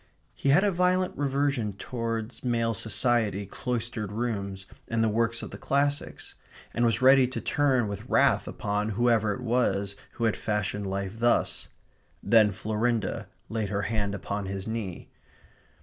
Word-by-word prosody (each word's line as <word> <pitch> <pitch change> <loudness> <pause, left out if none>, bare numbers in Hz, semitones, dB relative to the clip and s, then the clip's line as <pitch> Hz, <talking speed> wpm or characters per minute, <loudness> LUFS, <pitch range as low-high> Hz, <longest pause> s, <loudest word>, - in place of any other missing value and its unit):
He 140 - -1
had 145 +8 +6
a 205 - +3
violent 180 +1 +1
reversion 140 -6 0
towards 115 +2 -4
male 115 -2 +1
society, 110 -2 +1
cloistered 115 -1 -3
rooms, 100 -4 -3 0.2
and 115 0 +1
the 110 - +3
works 115 +2 0
of - - -7
the - - -8
classics; 145 +1 -1 0.4
and 120 - +1
was 115 +1 +2
ready 130 -1 +7
to 130 - -4
turn 130 -6 +2
with 100 -1 -6
wrath - - +3
upon 105 +1 -2
whoever 115 -3 +3
it 105 - -4
was 115 -5 0 0.2
who 115 - -5
had 110 -2 +2
fashioned 105 -1 -2
life 100 +2 -3
thus. 120 +1 +1 0.6
Then 110 0 +5
Florinda 110 +3 -1 0.2
laid 110 -3 -2
her 100 0 -1
hand 100 -1 -1
upon 100 +1 -4
his 95 +1 -4
knee. 110 -6 -5
115 Hz, 150 wpm, -27 LUFS, 105-125 Hz, 0.6 s, ready